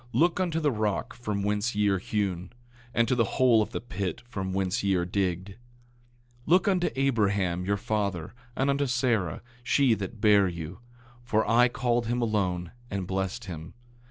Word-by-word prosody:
Look 170 +9 +3
unto 170 -3 0
the 150 -3 +2
rock 110 +1 -1
from 105 -4 -3
whence 105 +2 0
ye 105 0 +2
are 95 -1 +1
hewn, 95 -3 -2 0.4
and 115 0 +2
to - - +2
the 120 -2 +3
hole 125 -4 +5
of 105 - -1
the - - -4
pit 100 -4 -4
from 95 -5 -4
whence 95 +2 -1
ye 100 -1 +2
are 90 -1 +1
digged. 95 0 -1
8:2 - - -12 0.9
Look 180 +6 +4
unto 185 -3 +2
Abraham, 100 -9 +1
your 100 +1 +1
father, 100 -5 -2 0.2
and 135 +1 +2
unto 140 0 0
Sarah, 120 - 0 0.2
she 130 0 +3
that 105 +1 -5
bare 105 -2 +5
you; 85 0 -6 0.4
for 110 -2 +1
I 120 +2 +5
called 120 -2 0
him 120 +1 0
alone, 95 -7 -1 0.2
and 100 -2 -3
blessed 95 +5 -3
him. 80 -3 -8
105 Hz, 180 wpm, -27 LUFS, 95-120 Hz, 0.9 s, hole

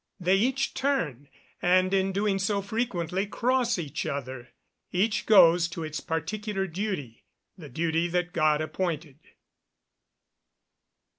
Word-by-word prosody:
They 180 +1 +3
each 260 +6 +1
turn, 160 - -1 0.3
and, 185 +1 +3
in 195 0 +2
doing 200 0 0
so, 200 +1 0
frequently 200 -4 -2
cross 240 +2 +1
each 155 -6 -4
other. 130 -3 -5 0.4
Each 205 +4 0
goes 175 -5 +6
to 170 -1 -6
its 155 -1 -4
particular 195 +5 -3
duty 180 - -4 0.3
the 155 -5 -11
duty 165 +4 0
that 175 0 -1
God 155 -2 +2
appointed. 155 -3 -3
180 Hz, 120 wpm, -27 LUFS, 160-205 Hz, 0.4 s, goes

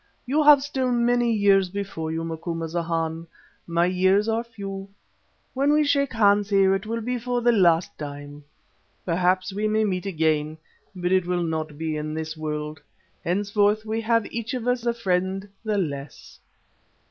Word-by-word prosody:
You 285 +5 +1
have 290 -2 +7
still 265 -3 -1
many 240 0 +2
years 200 -3 +3
before 190 -5 -4
you, 165 0 -3
Macumazahn; 165 0 -3 0.4
my 170 0 +2
years 190 +3 +2
are 225 +1 0
few. 195 -4 -7 0.6
When 275 +2 +2
we 300 0 +4
shake 280 -2 +1
hands 205 -2 +3
here 195 -1 +4
it 195 +2 -2
will 230 +1 -2
be 250 +2 -2
for 245 +1 -1
the 240 - +5
last 175 -6 +3
time. 145 0 -8 0.6
Perhaps 185 +2 +1
we 210 +2 -1
may 215 +1 +2
meet 190 -2 -1
again, 155 -3 0 0.4
but 180 0 -2
it 185 -2 +2
will 180 -1 0
not 160 -2 -3
be 160 -1 -2
in 155 0 -4
this 160 0 -4
world. 150 -1 -4 0.4
Henceforth 205 +3 +1
we 220 +1 -2
have 230 -1 +2
each 230 +3 -3
of 245 -1 -4
us 245 -1 0
a 235 - +2
friend 190 -2 -1 0.2
the 215 -2 -1
less." 145 -6 -5
195 Hz, 165 wpm, -24 LUFS, 165-225 Hz, 0.6 s, have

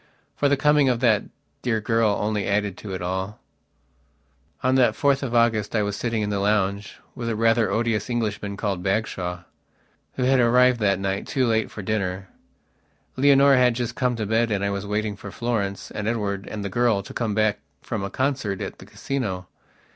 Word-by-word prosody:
For 145 - +2
the 140 - +3
coming 150 -1 +4
of 120 -2 +1
that 110 -5 +3 0.4
dear 115 -3 0
girl 110 -1 +1
only 105 -1 -1
added 100 -1 0
to 100 -3 -6
it 90 - -5
all. 95 +3 -3 1.2
On 130 +1 +3
that 130 -2 +4
4th 140 -1 +2
of 125 -3 -3
August 115 -2 +2
I 105 - +2
was 100 0 -2
sitting 115 -2 -1
in 105 - -2
the 100 - -1
lounge 100 0 0 0.2
with 115 -1 -4
a 115 - -1
rather 115 0 +3
odious 115 0 0
Englishman 105 -4 -2
called 100 -4 -2
Bagshawe, 90 -3 -2 0.7
who 130 - -2
had 130 +1 +4
arrived 125 +1 +4
that 100 -3 +2
night, 95 0 -2
too 130 -2 +1
late 110 -2 +1
for 105 - -8
dinner. 95 -2 -2 0.9
Leonora 140 0 +5
had 125 -2 +4
just 120 -1 -2
gone 125 -1 0
to 110 -2 -3
bed 115 +2 +1
and 100 -2 0
I 100 - 0
was 100 0 -4
waiting 105 0 -1
for 100 +1 -9
Florence 105 -2 -3
and 105 - -4
Edward 105 -4 -2
and 105 -2 -5
the - - -2
girl 115 -1 +1
to - - -10
come 110 -4 -2
back 110 -1 +2 0.2
from 110 -4 -3
a 100 - -3
concert 130 -8 -1
at - - -6
the - - -13
Casino. 100 -10 -4
110 Hz, 195 wpm, -24 LUFS, 100-120 Hz, 1.2 s, Leonora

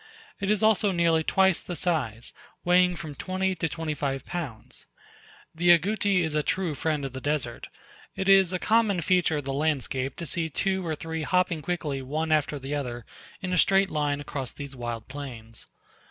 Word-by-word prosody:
It 200 -1 -2
is 210 0 +2
also 215 -2 +4
nearly 170 -2 +2
twice 190 +1 +3
the 175 - -6
size, 130 -11 -2 0.3
weighing 180 0 +4
from 160 -4 -7
twenty 185 +5 -1
to 165 -2 -2
twenty 160 -1 -3
five 135 -2 -3
pounds. 145 -11 -6 0.7
The 175 +2 +1
Agouti 200 +1 +1
is 160 -2 -2
a 150 - +2
true 180 +1 -1
friend 150 -1 -1
of 135 - -5
the 130 - -6
desert; 145 -5 -2 0.5
it 190 - -2
is 195 -2 +6
a 185 - 0
common 215 -2 +2
feature 175 -2 +2
of 145 - -4
the 135 - -2
landscape 135 -3 -1
to 170 - -5
see 160 +2 -1
two 190 +4 0
or 160 -2 -2
three 160 +1 -4
hopping 180 -1 +1
quickly 150 -4 -2
one 155 +5 -2
after 150 -1 +2
the 135 +1 -5
other 120 -5 -4 0.4
in 180 -1 -2
a 180 - +3
straight 195 0 +4
line 145 -1 0
across 140 -3 -4
these 140 -2 -8
wild 120 -2 -5
plains. 120 -5 -8
160 Hz, 185 wpm, -27 LUFS, 140-180 Hz, 0.7 s, is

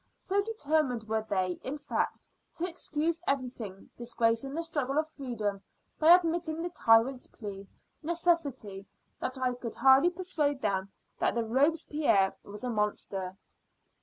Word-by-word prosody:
So 395 +1 0
determined 310 - 0
were 220 0 0
they, 185 -2 0
in 275 +3 -4
fact, 290 0 -2 0.3
to 345 - -1
excuse 330 -1 -1
everything, 245 -8 -3
disgracing 235 +2 0
the 335 - -1
struggle 290 -4 -1
of 310 0 +2
freedom, 230 -9 -4 0.4
by 325 +3 +9
admitting 335 -2 0
the 350 - -3
tyrant's 240 -2 +3
plea, 200 -3 -8 0.3
necessity, 295 - 0 0.3
that 255 - -3
I 255 -1 0
could 245 -2 -6
hardly 265 +6 +6
persuade 320 -6 -1
them 195 -3 -1 0.3
that - - +1
Robespierre 265 -3 +2
was 205 +2 -9
a 250 - -1
monster. 195 -3 -2
265 Hz, 135 wpm, -30 LUFS, 220-315 Hz, 0.4 s, by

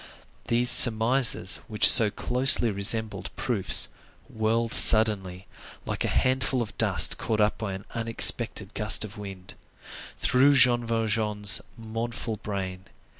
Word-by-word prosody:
These 120 +1 +2
surmises, 115 -3 +4
which 105 -1 +3
so 115 -4 +5
closely 125 +2 +1
resembled 100 -1 -2
proofs, 120 -8 0 0.4
whirled 115 +1 -4
suddenly, 100 -5 +2 0.4
like - - -6
a - - -4
handful 130 0 -3
of 105 - -14
dust - - +2
caught 110 -1 -5
up 105 0 -2
by 110 -4 -7
an 95 +1 -11
unexpected 115 -2 -1
gust 110 0 +2
of 105 0 -14
wind, 95 -3 -12 0.6
through 140 +3 0
Jean 120 -2 +2
Valjean's 110 -3 -2 0.2
mournful 115 0 -8
brain. 95 -2 -9
110 Hz, 125 wpm, -23 LUFS, 105-120 Hz, 0.6 s, so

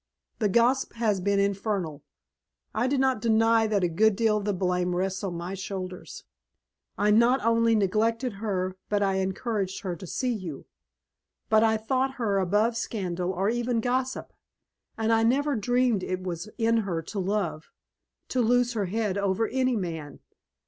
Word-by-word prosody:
The 210 -3 +2
gossip 240 +6 +2
has 215 -5 0
been 200 +1 +1
infernal. 200 -6 -1 0.7
I 230 +4 +1
do 275 +2 +1
not 260 -4 +1
deny 225 0 +3
that 205 -3 +1
a - - +4
good 205 +5 +3
deal 220 0 +2
of 205 - -4
the 210 - +1
blame 180 -1 0
rests 190 +2 -2
on 185 -3 -3
my 175 +2 -5
shoulders. 190 -1 -6 0.7
I 210 +1 +3
not 235 +3 +4
only 230 0 +3
neglected 225 +4 +1
her 185 -4 -2
but 205 -1 +1
I 195 -1 +1
encouraged 190 +1 -2
her 185 -5 -3
to 185 +1 -10
see 250 +7 -1
you. 180 -10 -6 0.8
But 220 0 +5
I 220 -1 +3
thought 260 +4 -1
her 210 -6 0
above 205 +5 +2
scandal 185 -5 -2
or 190 +2 -1
even 240 0 0
gossip, 255 +2 -2 0.6
and 225 0 +1
I 225 - +3
never 275 +5 +2
dreamed 245 -1 +1
it 185 0 -3
was 180 +2 -5
in 230 0 +2
her 180 -7 -2
to 200 +6 -5
love 185 -5 -2 0.6
to 255 - +1
lose 245 +1 +2
her 210 -4 -1
head 205 0 -1
over 200 +3 0
any 255 0 +1
man. 165 -7 -5
210 Hz, 170 wpm, -27 LUFS, 190-230 Hz, 0.8 s, But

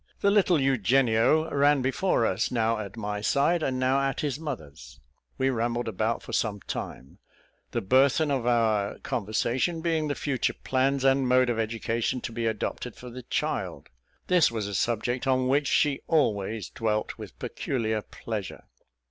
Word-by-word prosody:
The 200 - +4
little 190 -5 +4
Eugenio 130 - +3
ran 145 -1 +3
before 135 -1 +1
us, 110 - 0
now 115 -2 +1
at 100 +1 -7
my 105 -1 -3
side, 145 +9 +2
and 130 -4 -1
now 130 +2 +2
at 135 0 -1
his 145 -2 -2
mother's. 75 - -8 0.4
We 135 0 +2
rambled 120 0 -1
about 110 +2 -1
for - - -9
some 105 -3 0
time, 65 - -7 0.5
the - - -2
burthen 135 +8 +3
of 130 -4 -1
our 110 -4 +1
conversation 125 - -1
being 160 -2 0
the 145 - -1
future 140 -4 -1
plans 135 +1 +1
and 135 -1 +3
mode 125 0 +4
of 115 - -2
education 115 +2 -1
to - - -5
be 115 0 -2
adopted 110 +2 -3
for 125 -1 -10
the 125 +2 -8
child; - - -3 0.4
this 180 -3 +4
was 110 -3 -3
a 100 - -5
subject 120 +6 -1
on 130 -1 +2
which 140 +2 +2
she 145 -2 +2
always 110 - 0
dwelt 110 -2 -2
with - - -10
peculiar 110 -4 -2
pleasure. 105 -2 -6
125 Hz, 165 wpm, -27 LUFS, 110-135 Hz, 0.5 s, The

